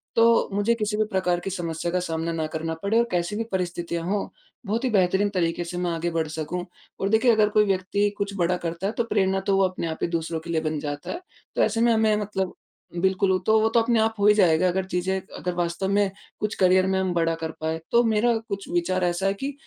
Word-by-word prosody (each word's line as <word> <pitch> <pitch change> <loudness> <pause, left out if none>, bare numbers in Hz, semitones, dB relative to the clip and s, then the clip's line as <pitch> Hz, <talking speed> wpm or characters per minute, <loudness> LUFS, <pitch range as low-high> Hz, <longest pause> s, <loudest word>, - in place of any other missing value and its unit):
तो 230 0 +4
मुझे 205 +3 +2
किसी 210 -2 -2
भी 215 - +3
प्रकार 180 -2 +1
की 185 - -5
समस्या 170 -2 -3
का 180 - +1
सामना 165 -1 -2
ना 160 -1 -1
करना 160 +1 -2
पड़े 205 +3 +2
और 235 - +2
कैसी 175 +3 -1
भी 225 - -1
परिस्थितियाँ 175 -2 -2
हों 200 +3 -1 0.4
बहुत 220 +5 -1
ही 260 - +1
बेहतरीन 195 -1 +2
तरीके 170 -2 0
से 175 +1 -6
मैं 175 -1 -1
आगे 165 +1 -2
बढ़ 160 -1 -1
सकूँ। 160 +3 -4 0.3
और 195 - 0
देखिए 225 +3 +4
अगर 215 -2 +3
कोई 210 0 +3
व्यक्ति 195 +1 +1
कुछ 200 0 -2
बड़ा 180 +1 +1
करता 170 +2 -3
है, 215 - -2
तो 235 - 0
प्रेरणा 195 -4 +1
तो 195 - +3
वो 195 - +4
अपने 185 -2 -4
आप 160 - -4
ही - - +1
दूसरों 165 -1 -2
के 165 +1 -11
लिए 160 -1 0
बन 155 -1 -2
जाता 145 0 -5
है, 345 - -5 0.3
तो - - +2
ऐसे 225 +1 +1
में 235 0 +4
हमें 220 -1 +3
मतलब 190 -3 -2 0.5
बिल्कुल 190 +1 +2
वो 185 - +3
तो 220 0 +4
वो 220 - +3
तो 230 +1 +3
अपने 230 0 +2
आप 220 0 +2
हो 200 - +2
ही 210 - +8
जाएगा 180 -3 +4
अगर 185 +1 0
चीज़ें 190 +1 -1 0.2
अगर 180 - -3
वास्तव 175 +2 -1
में 200 -1 +2 0.3
कुछ 210 0 -2
करियर 185 0 +5
में 190 0 +1
हम 185 -1 0
बड़ा 165 -1 +1
कर 160 - -2
पाए। 160 +1 -2
तो 235 +1 +5
मेरा 230 +1 +2
कुछ 200 -1 -4
विचार 180 +1 0
ऐसा 175 +2 0
है 195 - +2
कि 270 +8 -4
190 Hz, 250 wpm, -25 LUFS, 170-210 Hz, 0.5 s, ही